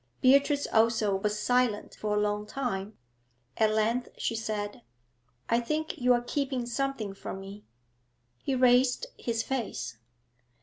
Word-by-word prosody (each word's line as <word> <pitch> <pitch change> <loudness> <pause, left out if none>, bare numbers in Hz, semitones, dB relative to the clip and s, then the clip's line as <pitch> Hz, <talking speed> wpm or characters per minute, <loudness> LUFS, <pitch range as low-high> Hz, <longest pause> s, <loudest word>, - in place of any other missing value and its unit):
Beatrice 280 +2 +4
also 220 -3 +3
was 210 +2 -1
silent 245 -1 +1
for 210 -1 -2
a - - +2
long 210 0 -1
time. 210 -5 -3 0.6
At 220 - +4
length 220 +3 +1
she 230 - -1
said 210 -2 -3 0.7
'I 235 - +3
think 305 +6 -2
you 250 0 +3
are 240 0 +1
keeping 265 -1 -1
something 240 -4 -2
from 195 0 -7
me?' 200 +2 -10 0.7
He 270 - -1
raised 250 - +4
his 230 -1 -1
face. 245 - -3
230 Hz, 135 wpm, -29 LUFS, 210-255 Hz, 0.7 s, Beatrice